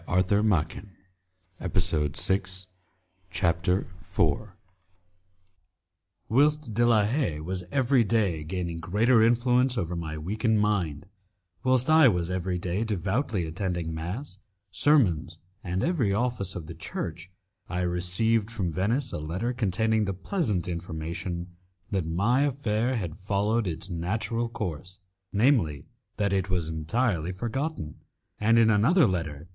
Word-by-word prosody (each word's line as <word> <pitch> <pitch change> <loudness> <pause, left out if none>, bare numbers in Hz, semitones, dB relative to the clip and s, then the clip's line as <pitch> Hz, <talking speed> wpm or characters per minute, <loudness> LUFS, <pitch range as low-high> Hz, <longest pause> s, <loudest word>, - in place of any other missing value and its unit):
de - - -10
Bragadin's 95 -1 +1 0.7
Palace 85 -6 +1
My 95 - +3 0.9
Departure 90 +1 +1 0.2
for 85 -7 +2
Paris 110 - -13 1.8
Whilst 145 0 +2
De 120 +3 +2
la 110 -3 +4
Haye 110 - 0
was 90 +4 -4
every 130 -2 +3
day 100 -8 +1
gaining 85 0 -4
greater 110 +7 +3
influence 125 +2 +3
over 90 -4 -2
my 80 -2 -4
weakened 110 +7 0
mind, 90 -8 0 0.6
whilst 130 0 +3
I 155 -2 +7
was 90 -5 +1
every 90 0 -1
day 90 +4 -2
devoutly 105 - -1
attending 85 0 -3
mass, 95 - -5 0.3
sermons, 95 - +3 0.3
and 90 +1 -2
every 150 - +1
office 105 -3 -1
of 85 - -5
the 85 - -8
Church, 85 +2 -6 0.4
I 90 0 -2
received 90 +5 +1
from 95 -8 -3
Venice 115 - 0
a - - -3
letter 95 +11 -2
containing 110 -1 +1
the 100 -1 -2
pleasant 105 - -1
information 85 +1 -4 0.5
that 95 -5 -1
my 100 +11 +2
affair 125 -4 0
had 90 -9 -3
followed 105 +3 0
its 85 +2 -4
natural 110 +7 -2
course, 90 -3 -5 0.3
namely, 105 - +2 0.3
that 100 -1 +1
it 95 0 0
was 85 -4 -1
entirely 85 +2 0
forgotten; 115 - -4 0.4
and 115 +2 +4
in 115 -1 +5
another 140 - +5
letter 85 -7 -1
M. 80 - -14
95 Hz, 130 wpm, -27 LUFS, 85-115 Hz, 1.8 s, I